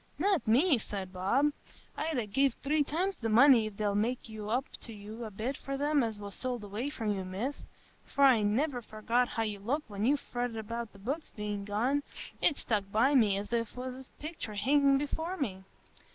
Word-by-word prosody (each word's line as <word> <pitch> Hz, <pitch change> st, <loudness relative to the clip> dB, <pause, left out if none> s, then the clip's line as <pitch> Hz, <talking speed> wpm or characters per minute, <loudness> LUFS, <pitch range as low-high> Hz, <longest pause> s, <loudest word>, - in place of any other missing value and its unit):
"Not 375 Hz, -, +1 dB
me!" 265 Hz, +5 st, +5 dB
said 195 Hz, -3 st, -5 dB
Bob. 240 Hz, +11 st, +2 dB, 0.4 s
"I'd 315 Hz, -2 st, -1 dB
ha' 220 Hz, -, -2 dB
gev 270 Hz, +4 st, +2 dB
three 295 Hz, +2 st, +1 dB
times 360 Hz, +6 st, -2 dB
the 225 Hz, -, 0 dB
money 235 Hz, 0 st, +7 dB
if 205 Hz, -2 st, -9 dB
they'll 210 Hz, -1 st, +1 dB
make 235 Hz, +5 st, 0 dB
up 220 Hz, +5 st, -1 dB, 0.2 s
to 230 Hz, -, -7 dB
you 215 Hz, +2 st, -7 dB
a -, -, -5 dB
bit 220 Hz, +7 st, -3 dB
for 275 Hz, +1 st, -4 dB
them 290 Hz, +1 st, +2 dB
as 225 Hz, -3 st, -1 dB
was 200 Hz, -1 st, -7 dB
sold 250 Hz, -4 st, -3 dB
away 210 Hz, +7 st, -3 dB
from 220 Hz, -7 st, -1 dB
you, 190 Hz, -1 st, -3 dB
Miss. 200 Hz, +10 st, -4 dB, 0.4 s
For 280 Hz, -, 0 dB
I'n 215 Hz, -6 st, +5 dB
niver 270 Hz, -2 st, 0 dB
forgot 230 Hz, +3 st, 0 dB
how 225 Hz, -, -1 dB
you 210 Hz, -2 st, -3 dB
looked 255 Hz, +5 st, -2 dB
when 205 Hz, +3 st, 0 dB
you 290 Hz, +2 st, +4 dB
fretted 245 Hz, -4 st, -4 dB
about 230 Hz, +1 st, -4 dB
the -, -, -16 dB
books 275 Hz, +11 st, -4 dB
bein' 210 Hz, -1 st, -3 dB
gone; 240 Hz, +8 st, +1 dB, 0.4 s
it's 295 Hz, -, +3 dB
stuck 200 Hz, -3 st, -1 dB
by 240 Hz, +7 st, +4 dB
me 215 Hz, -7 st, +4 dB
as 205 Hz, +3 st, -5 dB
if 230 Hz, -2 st, 0 dB
it -, -, -19 dB
was 255 Hz, +1 st, -6 dB
a -, -, -33 dB
pictur 300 Hz, -9 st, -6 dB
hingin' 275 Hz, +4 st, +4 dB
before 320 Hz, +6 st, -2 dB
me. 200 Hz, -, -2 dB
235 Hz, 210 wpm, -31 LUFS, 210-275 Hz, 0.4 s, money